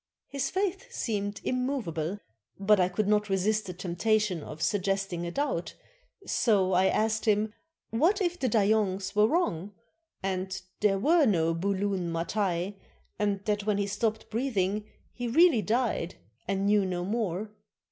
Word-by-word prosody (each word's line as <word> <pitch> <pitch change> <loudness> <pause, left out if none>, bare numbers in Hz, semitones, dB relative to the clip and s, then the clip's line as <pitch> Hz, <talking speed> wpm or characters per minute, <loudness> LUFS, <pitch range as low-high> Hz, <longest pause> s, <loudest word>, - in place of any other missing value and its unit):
His 275 -1 -2
faith 390 +5 -2
seemed 205 - -2
immov 255 -2 -1
able, 165 +4 -3 0.4
but 200 +1 +4
I 180 0 +3
could 200 +2 -1
not 210 0 +2
resist 205 +2 +1
the 180 - -4
temptation 185 +1 0
of 155 +1 -7
suggesting 195 -3 0
a - - -4
doubt, 275 -11 -2 0.5
so 195 -5 +2
I 185 +1 +4
asked 220 +1 +1
him 210 0 +2 0.4
what 330 - +3
if 355 -2 -1
the 255 - +1
Dayongs 200 -2 +1
were 210 +1 +5
wrong, 205 - -1 0.5
and 190 0 -2 0.2
there 205 -2 +3
were 305 - +4
no 165 -5 +2
Bulun 190 0 -1
Matai, 180 +2 -1 0.4
and 205 -1 0
that 210 -1 -1
when 210 -1 +2
he 200 - +1
stopped 215 +2 -2
breathing 210 -4 0 0.3
he 245 0 -4
really 305 -1 +5
died 220 -4 0 0.3
and 195 +1 0
knew 205 0 +4
no 180 -2 -2
more. 210 -1 -2
205 Hz, 150 wpm, -28 LUFS, 190-225 Hz, 0.5 s, were